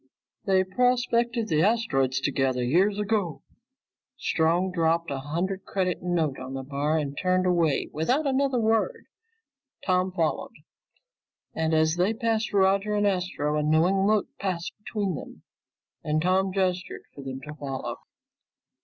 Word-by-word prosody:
"They 190 -1 +3
prospected 240 +2 +1
the 155 -4 +2
asteroids 135 - +2
together 135 -3 0
years 185 +11 +2
ago." 205 -6 -1 0.7
Strong 170 +3 +1
dropped 165 -2 +1
a 135 - -2
hundred 175 +7 -3
credit 185 -2 -1
note 165 -6 0
on 130 +1 -6
the 135 - -4
bar 145 +3 -1
and 145 -2 -2
turned 185 +3 +1
away 170 -5 +2
without 250 - +1
another 275 -1 +1
word. 225 - +1 0.8
Tom 185 0 +2
followed, 165 -4 -1 1.0
and 160 0 0
as 160 +1 +2
they 190 +5 +2
passed 225 -1 0
Roger 200 +1 +2
and 205 0 +2
Astro, 180 -6 0
a 150 - +1
knowing 170 +6 +3
look 215 -1 +3
passed 180 -3 -3
between 205 -4 -2
them, 145 - -9 0.6
and 155 0 0
Tom 185 +3 +2
gestured 185 -1 -1
for 140 - -10
them 135 -1 -5
to 150 +1 -8
follow. 140 -3 -5
180 Hz, 140 wpm, -26 LUFS, 155-200 Hz, 1.0 s, They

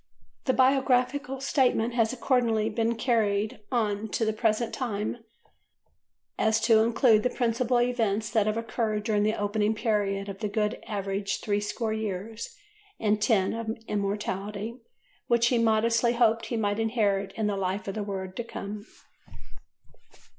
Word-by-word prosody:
The 260 - +2
Biographical 265 +1 +2
Statement 250 -4 +2
has 230 -2 +2
accordingly 235 -4 +1
been 230 +1 0
carried 220 -3 0
on 215 -3 0
to 225 - +1
the 220 - 0
present 220 +1 0
time 215 -4 -2
so - - -23 1.2
as 220 0 +3
to 225 0 +5
include 225 0 +4
the 250 - +1
principal 245 0 +1
events 225 -3 0
that 215 -2 +2
have 215 +1 0
occurred 225 -2 -2
during 210 -2 +1
the 215 +1 +1
opening 210 +1 0
period 205 -3 0
of 195 -1 -7
the 215 - -1
"good 210 0 -1
average 200 -1 -2
three 205 -1 0
score 215 +1 -2
years 220 +1 -4 0.5
and 210 -1 +1
ten 205 -4 +2
of 225 0 -4
immortality" 205 +2 -3 0.5
which 235 -1 +3
he 245 - +2
modestly 230 +1 +3
hoped 230 -2 +2
he 235 - -2
might 205 -1 0
inherit 205 -4 +1
in 220 +1 -2
the 205 -1 0
life 195 +2 -2
of 195 - -2
the 215 - -3
world 190 -2 -5
to 240 - -2
come. 210 -2 -7
220 Hz, 155 wpm, -27 LUFS, 205-235 Hz, 1.2 s, to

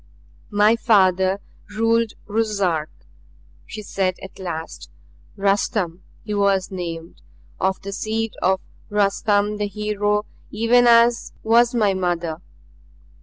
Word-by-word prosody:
"My 210 +2 +4
father 190 -4 +3 0.4
ruled 225 0 +2
Ruszark," 200 -7 0 0.8
she 215 - -7
said 190 -2 -1
at 190 - -11
last. 165 -3 -6 0.5
"Rustum 195 -3 0 0.2
he 210 - -4
was 200 -2 +1
named, 170 -3 -6 0.4
of 190 0 0
the 200 - -5
seed 220 +2 -2
of 190 +1 +2 0.3
Rustum 205 0 +1
the 205 0 -1
Hero 210 0 -1 0.2
even 235 +3 +3
as 235 0 +4
was 235 +2 +4
my 210 -4 +3
mother. 175 -3 -2
205 Hz, 110 wpm, -22 LUFS, 185-220 Hz, 0.8 s, My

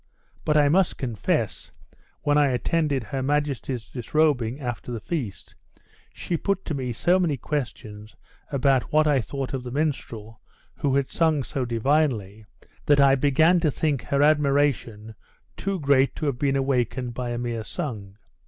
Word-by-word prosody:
But 150 0 +3
I 145 -1 +5
must 180 +5 +2
confess, 115 -7 -2 0.5
when 145 - +2
I 145 -1 +4
attended 140 +1 0
her 130 +5 -4
majesty's 135 -4 -1
disrobing 130 -1 0
after 125 -2 -5
the 115 - -3
feast, 120 - -5 0.6
she 170 - -3
put 195 +3 -2
to 160 - -3
me 130 -3 -3
so 175 +11 +2
many 160 -6 +1
questions 110 -7 -5 0.4
about 135 -2 +1
what 155 +1 +4
I 145 -4 +3
thought 135 +4 -5
of 135 - -2
the 125 - -7
minstrel 120 -6 -3 0.4
who 135 -2 0
had 140 -1 0
sung 160 -4 +2
so 135 -1 -3
divinely, 115 -4 0 0.4
that 145 -1 +5
I 140 -1 +6
began 150 +6 +4
to 165 -2 +2
think 145 -2 -1
her 140 0 +2
admiration 140 -7 +1 0.4
too 195 -1 -3
great 140 -2 +3
to 155 - -4
have 135 -4 -1
been 140 -1 +1
awakened 125 -2 -1
by 125 0 -4
a 120 - -3
mere 120 -2 -3
song. 105 - -6
135 Hz, 160 wpm, -25 LUFS, 120-150 Hz, 0.6 s, I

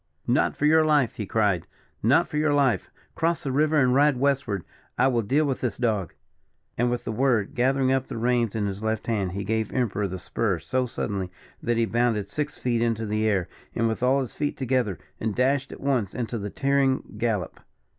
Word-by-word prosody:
"Not - - +1
for 150 - 0
your 160 +1 +5
life!" 150 -7 +3
he 105 - -5
cried 100 -6 +1 0.3
"not - - +4
for 150 - -4
your 150 -1 +2
life! 135 -4 +2 0.2
Cross 165 0 0
the 135 - -2
river, 155 +3 +2
and 125 -2 +3
ride 145 0 +4
westward. 130 - 0 0.3
I - - +4
will 120 -3 +2
deal 140 +9 +2
with 135 -3 -2
this 125 - -2
dog." 105 - -1 0.6
And, 120 +1 +1
with 120 0 -2
the - - -3
word, 120 -1 +1
gathering 130 0 +2
up 135 -1 +1
the - - -6
reins 120 -2 +1
in 105 -2 0
his 100 0 -4
left 110 0 -1
hand, 100 -6 -1
he 100 +1 -3
gave 110 +2 -1
Emperor 105 -5 0
the 95 0 -5
spur 100 +1 -1
so 130 +8 -1
suddenly 100 -5 -3 0.3
that 120 0 0
he 115 - +3
bounded 115 -2 0
six 150 +9 -3
feet 120 -2 0
into 115 -1 0
the 110 +1 0
air, 95 -5 +1 0.3
with 115 0 0
all 130 +2 +3
his 130 - -5
feet 145 -1 -2
together, 125 -7 0 0.2
and 110 -2 -2
dashed 135 +2 +1
at - - -9
once 125 -8 0
into 120 -2 -3
his 100 0 -5
tearing 135 -1 +2 0.2
gallop. 110 -7 -1
120 Hz, 205 wpm, -25 LUFS, 105-135 Hz, 0.6 s, your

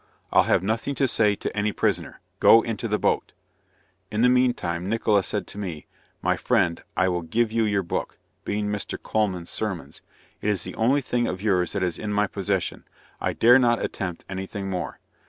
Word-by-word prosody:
"I'll - - +6
have - - +2
nothing 115 +7 -1
to 135 - +2
say 105 -4 +3
to - - -5
any 105 0 +1
prisoner, - - -1 0.2
go 115 0 +7
into 115 0 -3
the 105 -1 +1
boat." - - 0 0.8
In 110 +2 0
the 125 - +6
mean 125 0 +4
time 85 +2 -3
Nickola 110 -2 +2
said - - -3
to 100 - -9
me, 90 -7 -5 0.4
"My - - +2
friend, 85 -1 +1 0.2
I 90 - +3
will 90 -1 0
give 110 +7 0
you 115 0 +2
your 100 -2 +1
book," 85 - -3 0.3
(being 105 0 -2
Mr. 105 -1 -3
Colman's 95 -6 -1
Sermons,) 90 -10 -4 0.4
"it 105 - 0
is 95 -5 0
the - - -6
only 130 +6 +2
thing 120 -2 0
of 95 +2 -4
yours 90 -5 +1
that 100 - -1
is 90 -3 -2
in 105 - -3
my 105 0 +2
possession; 95 -2 -2 0.4
I - - -1
dare 120 +3 +6
not 120 -2 +3
attempt 90 -4 -5
any 95 0 -5
thing 95 -1 -5
more." 90 - -4
105 Hz, 200 wpm, -25 LUFS, 95-115 Hz, 0.8 s, go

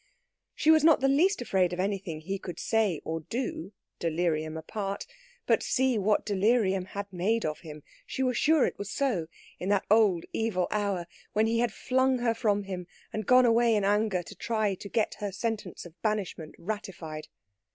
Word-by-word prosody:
She 315 - +4
was 315 -1 +5
not 320 -1 +6
the 270 - +2
least 325 +4 +3
afraid 185 -5 +1
of 175 - -4
anything 190 -5 -2
he 195 +4 -4
could 175 - -7
say 215 -8 +1
or 165 0 -2
do, 195 - -4 0.3
delirium 160 -1 -1
apart; 195 +4 -4 0.4
but - - +3
see 260 -1 +1
what 205 +1 +2
delirium 200 -2 +2
had 200 +1 -7
made 215 +6 0
of 155 -1 -2
him 150 -2 -10 0.2
she 265 - -2
was 250 -1 +1
sure 310 +2 +4
it - - -4
was 200 0 -5
so 210 -11 0 0.3
in 185 - -3
that 200 -1 +2
old 210 -6 +4
evil 200 -6 0
hour 200 -4 -1 0.3
when 215 +1 +3
he 230 +1 +1
had 240 -1 +1
flung 260 +3 +1
her 240 -2 +1
from 210 -3 +1
him 185 -2 -6 0.3
and 215 -2 -4
gone 255 0 +6
away 230 -1 +4
in 205 - +1
anger 205 -2 +1
to - - -10
try 215 -3 -1
to 200 +2 -8
get 220 -1 0
her 205 -1 -3
sentence 205 -3 -4
of 175 +1 -14
banishment 200 -7 -2
ratified. 175 -6 -6
205 Hz, 185 wpm, -28 LUFS, 180-230 Hz, 0.4 s, not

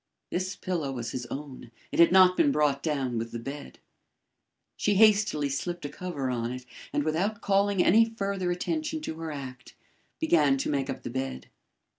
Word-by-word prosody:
This 185 +1 -2
pillow 170 -7 -3
was 120 -3 -4
his 125 -1 -5
own; 140 -4 -7 0.2
it - - -3
had 170 0 +7
not 185 -1 +7
been 290 - +3
brought 145 - +1
down 135 -7 -1
with 115 +1 -5
the - - -4
bed. 135 +5 -8 1.0
She 205 - +1
hastily 205 -8 +4
slipped 170 +5 -3
a - - -3
cover 145 -5 -4
on 120 -1 -2
it, 125 0 -7 0.3
and 145 - 0
without 180 +8 -1
calling 200 -1 +2
any 225 +5 +6
further 200 -5 -3
attention 310 - -2
to 160 - -6
her 165 -1 -4
act, 130 -3 -8 0.4
began 150 - +3
to 135 - -2
make 140 -2 -1
up - - -5
the - - -5
bed. 130 - -4
155 Hz, 180 wpm, -28 LUFS, 135-195 Hz, 1.0 s, had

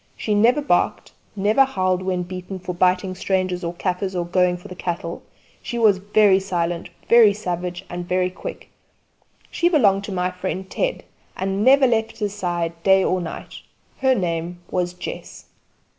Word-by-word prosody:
She 215 - -1
never 240 +8 +3
barked; - - 0 0.2
never 215 +6 +4
howled 185 -8 0
when 185 -1 -1
beaten 185 +1 -7
for 180 0 -5
biting 185 +1 +1
strangers 185 -1 -1
or 170 0 -3
kaffirs 185 +1 -2
or 175 -1 -1
going 180 0 +2
for 175 - -12
the - - -8
cattle; 170 -2 -4 0.4
she 240 - -5
was 215 -5 +4
very 205 -1 +4
silent, 175 -2 -2 0.2
very 230 -3 +7
savage, 180 -2 -4
and 175 0 -6
very 180 0 +1
quick. - - -8 0.8
She 345 - +2
belonged 200 - +3
to 205 - -6
my 180 -1 -1
friend 185 +1 -4
Ted, - - -2 0.3
and 195 +2 -1
never 270 +2 +6
left 225 -3 0
his 205 -2 -2
side 170 -4 -3
day 190 +1 +4
or 185 0 +1
night. 165 - -7 0.4
Her 265 -1 +3
name 175 -2 -3
was 180 -1 -1
Jess. - - -8
185 Hz, 165 wpm, -22 LUFS, 180-205 Hz, 0.8 s, very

